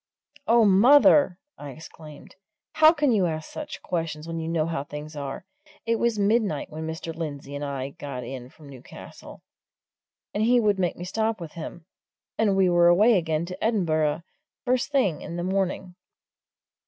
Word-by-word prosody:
"Oh, 230 0 +5
mother!" 230 +1 +6 0.2
I 145 - -8
exclaimed. 155 0 -13 0.4
"How 310 0 +7
can 295 -5 +1
you 200 -6 +2
ask 155 -1 -5
such 300 -1 -7
questions 165 -3 -3
when 165 0 -4
you 160 - -4
know 165 -1 0
how 160 -4 -3
things 150 +1 -9
are! 140 +3 -6 0.4
it 230 0 +1
was 235 -1 0
midnight 205 -7 0
when 160 +1 -6
Mr. 160 +1 -5
Lindsey 145 -4 -6
and 145 +1 -5
I 140 -2 -4
got 140 -3 -7
in 130 -1 -8
from 150 +2 -17
Newcastle, 130 -3 -12 0.9
and 205 - -1
he 240 +3 +4
would 205 -3 +1
make 180 -2 0
me 175 - -6
stop 220 +3 -1
with 165 -3 -8
him 165 0 -9 0.5
and 210 -3 +2
we 190 -1 +4
were 175 -1 +4
away 210 +7 +5
again 160 -2 0
to 180 +1 -8
Edinburgh 160 -8 0 0.4
first 255 +2 0
thing 255 - +1
in 170 - -7
the 175 - -3
morning." 190 -1 -2
175 Hz, 170 wpm, -25 LUFS, 155-215 Hz, 0.9 s, How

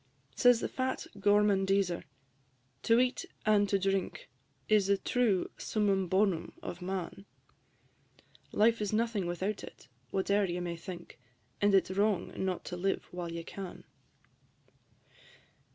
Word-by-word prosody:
Says 245 - +5
the - - -1
fat 260 0 -2
Gormandiser, 195 -3 +2 0.8
"To 230 +1 +4
eat 255 0 +1 0.2
and 205 -1 +4
to 200 - +3
drink 195 -6 -2 0.4
Is 210 -2 +4
the 200 0 +3
true 225 -4 +1
summum 200 -3 +1
bonum 185 -2 +1
of 175 - -6
man: 190 +1 -4 1.3
Life 225 +1 +3
is 210 - -1
nothing 220 -4 0
without 190 +4 -2
it, - - -12 0.2
whate'er 200 +3 +1
you 175 -1 -3
may 175 -1 -3
think, 170 +1 -9 0.4
And 205 -1 +4
it 190 - +5
's - - -7
wrong 205 -1 +1
not 190 -2 -2
to 180 - -5
live 195 +2 -1
while 175 -1 -5
you 170 0 -5
can." 190 -3 -8
195 Hz, 135 wpm, -31 LUFS, 180-210 Hz, 1.3 s, Says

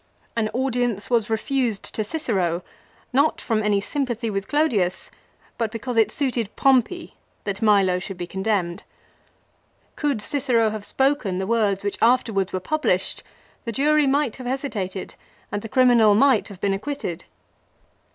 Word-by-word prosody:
An 220 -2 0
audience 245 -3 0
was 230 -3 +2
refused 230 -1 -1
to 215 - -1
Cicero, 195 - -1 0.5
not 280 +4 +3
from 225 -2 0
any 210 -1 +2
sympathy 240 -1 -2
with 195 -1 -3
Clodius, 230 - 0 0.5
but 230 -2 0
because 230 +3 -5
it 225 -1 +4
suited 245 -7 -1
Pompey 270 +6 +2 0.3
that 200 0 -4
Milo 200 -4 +4
should 185 0 -7
be 175 - -4
condemned. 190 -2 -1 1.1
Could 285 -6 0
Cicero 235 -2 +1
have 215 -1 -6
spoken 265 -9 +1
the 190 - -2
words 205 -3 +1
which 205 - -2
afterwards 225 -5 +2
were 185 - -2
published 305 +11 -1 0.4
the 230 - -3
jury 295 +4 +3
might 275 -3 +1
have 255 -2 -7
hesitated 215 -8 -4 0.4
and 205 - -2
the 225 - -8
criminal 240 -5 +5
might 260 -1 +4
have 195 -3 -11
been 200 0 +1
ac 195 - -3
quitted. 275 - -5
225 Hz, 150 wpm, -23 LUFS, 200-265 Hz, 1.1 s, criminal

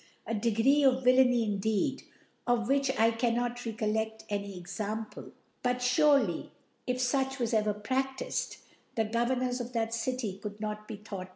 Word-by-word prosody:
A - - -3
Degree 230 +6 +3
of 260 -1 +4
Villainy, 250 -1 +5
in 205 -2 -1
deed, 220 +6 0 0.5
of 240 -2 +2
which 275 0 +2
I 225 +1 +5
cannot 240 +1 0
rccolleft 220 -1 -2
any 200 -2 -3
Ex 175 +4 -8
ample: 215 +1 -4 0.3
But 250 0 +1
furely.if 250 - +1
fuch 265 +1 0
was 240 -2 -1
ever 210 -1 +2
pradifed, 265 +5 -2 0.4
the 225 - +1
Governors 245 +3 0
of 245 +1 -7
that 225 -1 -1
City 230 -4 -2
could 210 0 -6
not 215 0 -4
be 220 - -5
thought. 195 -3 -7
230 Hz, 155 wpm, -30 LUFS, 215-255 Hz, 0.5 s, Villainy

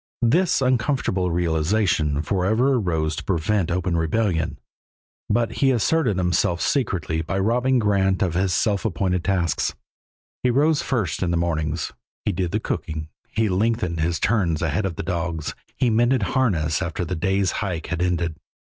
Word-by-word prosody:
This 155 +4 +3
uncomfortable 120 -7 +1
realization 80 -2 +1
forever 110 +9 +2
arose 80 -9 0
to - - -4
prevent 95 +1 0
open 90 0 0
rebellion, 85 0 0 0.7
but 115 -2 +1
he 135 - +5
asserted 125 - +2
himself 90 -1 +1
secretly 85 - 0
by 90 +4 -3
robbing 120 +6 +2
Grant 100 -4 +2
of 90 -4 0
his 95 +1 +1
self 100 +2 +1
appointed 90 -3 0
tasks. 90 -5 0 0.7
He 125 - +2
rose 145 +5 +3
first 110 - -1
in 90 - +1
the 85 - +1
mornings, 80 -2 -1 0.3
he - - +2
did 90 0 -1
the 105 - -1
cooking, 80 -6 -4 0.2
he 110 0 0
lengthened 95 -3 0
his 85 +1 0
turns 90 -7 +1
ahead 85 +6 0
of 85 - -5
the - - -4
dogs, 85 -4 -3 0.2
he 125 -3 +2
mended 120 +1 +3
harness 90 - +1
after 85 0 -2
the 85 - -4
day's 95 +3 +1
hike 90 -6 -3
had 90 -1 -3
ended. 85 -2 0
95 Hz, 155 wpm, -23 LUFS, 85-110 Hz, 0.7 s, he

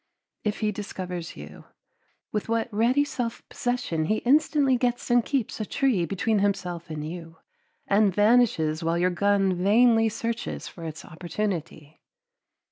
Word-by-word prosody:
If 210 +1 -2
he 215 -1 +1
discovers 180 -4 -6
you, - - -11 0.7
with 210 +1 -3
what 230 0 -1
ready 240 +7 +3
self 245 -5 -4
possession 245 -11 -2
he 215 +6 +1
instantly 285 0 +3
gets 245 -1 -1
and 240 -1 +5
keeps 265 -5 -2
a 215 - -2
tree 230 -11 +1
between 205 +4 0
himself 180 -4 -2
and 155 -1 -5
you 165 -1 -8 0.5
and 205 0 +3
vanishes 205 -7 +3
while 165 +1 +1
your 180 +1 +2
gun 195 +1 +2
vainly 225 +5 +4
searches 230 +2 -4
for 170 - -9
its 160 -1 -7
opportunity. 165 -3 -5
205 Hz, 140 wpm, -26 LUFS, 175-235 Hz, 0.7 s, and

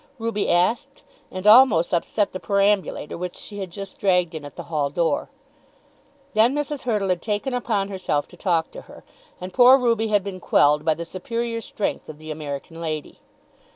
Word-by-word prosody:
Ruby 225 -3 -2
asked, 180 +7 0 0.3
and 185 +1 -7
almost 210 -7 +6
upset 200 +4 0
the 185 - -5
perambulator 200 -5 0
which 180 0 -5
she 205 -1 -7
had 190 -2 -5
just 195 +2 -9
dragged 180 -4 +2
in 160 -2 -6
at 145 - -10
the - - -7
hall 150 -4 -1
door. 165 +3 -1 1.0
Then 230 +5 +4
Mrs. 295 -1 -3
Hurtle 210 -5 0
had 180 -2 0
taken 215 +4 -2
upon 215 -5 -1
herself 185 -7 -2
to - - -14
talk 170 -3 0
to - - -9
her, - - -13 0.4
and 180 +1 -7
poor 255 +1 +7
Ruby 230 -3 +1
had 205 -2 +2
been 190 -2 -6
quelled 150 -3 +3
by 160 -1 +2
the 170 - -6
superior 230 +6 -4
strength 210 - -4
of 155 - -9
the 155 0 -8
American 155 +2 -6
lady. 155 -2 -5
190 Hz, 185 wpm, -23 LUFS, 165-220 Hz, 1.0 s, poor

